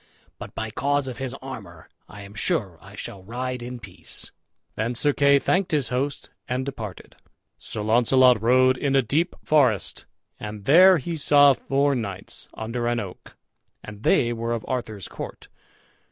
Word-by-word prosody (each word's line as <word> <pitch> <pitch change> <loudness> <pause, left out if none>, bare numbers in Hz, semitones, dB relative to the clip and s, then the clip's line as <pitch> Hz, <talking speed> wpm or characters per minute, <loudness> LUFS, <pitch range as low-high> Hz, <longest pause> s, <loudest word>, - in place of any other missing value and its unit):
But - - -9
by 110 -1 -4
cause 145 +3 0
of 125 - -6
his 130 -1 -4
armor - - -9 0.2
I 105 0 -10
am 100 0 -12
sure 105 - -1
I 100 +3 -13
shall 100 - -7
ride 125 +5 -4
in 125 +1 -6
peace." - - -5 0.4
Then 115 +3 -2
Sir 145 +4 +2
Kay 140 0 +5
thanked 180 +6 +1
his 145 -6 0
host 135 +3 -3 0.2
and 130 +1 -1
departed. 110 -8 -7 0.4
Sir 105 - -5
Launcelot 120 +1 +4
rode 130 +2 +4
in 140 -2 +1
a 135 - +4
deep 160 +9 0
forest, 130 - +2 0.3
and 105 -1 -7
there 180 +7 +7
he 165 +3 -4
saw 145 -2 +6
four 140 +2 +1
knights, 100 -7 -5
under 115 +2 -3
an 120 0 +1
oak, 95 -4 -9 0.5
and 105 -1 -10
they 120 +1 +3
were 115 0 -2
of 115 - -4
Arthur's 110 -7 -4
court. - - -8
125 Hz, 165 wpm, -24 LUFS, 110-140 Hz, 0.5 s, there